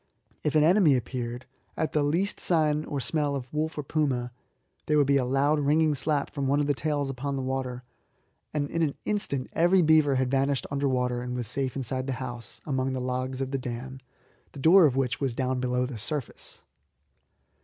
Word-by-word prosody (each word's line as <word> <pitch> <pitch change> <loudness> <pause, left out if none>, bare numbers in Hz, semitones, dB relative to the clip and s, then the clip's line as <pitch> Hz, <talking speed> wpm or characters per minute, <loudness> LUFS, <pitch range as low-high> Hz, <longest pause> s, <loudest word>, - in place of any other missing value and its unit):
If 150 - 0
an 155 - +5
enemy 170 -3 +5
appeared 120 0 -4 0.3
at 160 - -1
the 150 - +2
least 170 +8 0
sign 155 -3 +1
or 145 - -3
smell 145 +1 -1
of 130 0 -6
wolf 155 +1 -2
or 150 - -2
puma 135 -5 -1 0.6
there 150 - +3
would 145 - +5
be 140 0 +3
a 135 - +1
loud 140 +4 +2
ringing 150 +2 +3
slap 145 0 0
from 140 -2 -2
one 140 +2 +2
of 145 - +1
the 145 - +2
tails 145 -1 -1
upon 135 +2 -3
the 135 - -3
water, 130 -1 -3 0.7
and 145 -2 -1
in 165 - -1
an 150 -4 +1
instant 140 -11 -1
every 175 +2 +4
beaver 155 -3 +4
had 130 -1 0
vanished 135 0 +1
under 140 0 0
water 125 -1 0
and 125 0 -4
was 125 -1 -2
safe 130 +3 -1
inside 130 0 -3
the 135 - -1
house 120 -3 -6
among 130 -2 -1
the 130 - -2
logs 130 +1 -3
of 135 0 -3
the 135 - -1
dam, 130 +1 -6 0.5
the - - -9
door 165 +4 +7
of 130 - -1
which 130 -3 -1
was 130 -4 -1
down 130 0 -1
below 125 0 0
the 125 -3 -6
surface. 140 +3 -5
135 Hz, 205 wpm, -27 LUFS, 130-150 Hz, 0.7 s, door